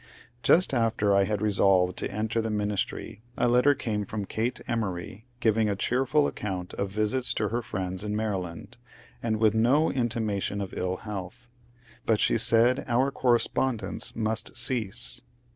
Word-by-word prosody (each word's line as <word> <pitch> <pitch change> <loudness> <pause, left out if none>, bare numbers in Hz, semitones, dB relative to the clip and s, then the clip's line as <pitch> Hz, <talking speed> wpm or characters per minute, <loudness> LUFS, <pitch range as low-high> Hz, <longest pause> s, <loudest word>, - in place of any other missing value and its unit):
Just 175 +2 +4
after 115 -4 +2
I 100 0 +4
had 105 0 -2
resolved 95 -3 +3
to - - -1
enter 110 +2 -1
the 110 - -3
ministry 105 +1 -3 0.2
a - - +2
letter 125 +4 +4
came 105 -5 -2
from 105 0 -4
Elate 115 +5 -2
Emory 105 -1 -4
giving 110 -1 +2
a 100 - 0
cheerful 130 +8 +1
accoimt 95 -3 -5
of 100 - -2
visits 110 +6 0
to 105 -1 0
her 120 +3 -1
friends 95 -3 -4
in 105 0 -2
Maryland, 105 +1 -4 0.4
and 110 -2 0
with 110 -1 +3
no 125 +8 +3
intimation 110 -5 -1
of 100 -2 -5
ill 90 0 -1
health; 100 +3 -7 0.6
but 110 -2 +3
she - - +2
said 115 +3 +4
our 130 +3 +2
correspondence 125 -1 0
must 110 +1 -2
cease. 120 0 -2
110 Hz, 155 wpm, -27 LUFS, 100-120 Hz, 0.6 s, Just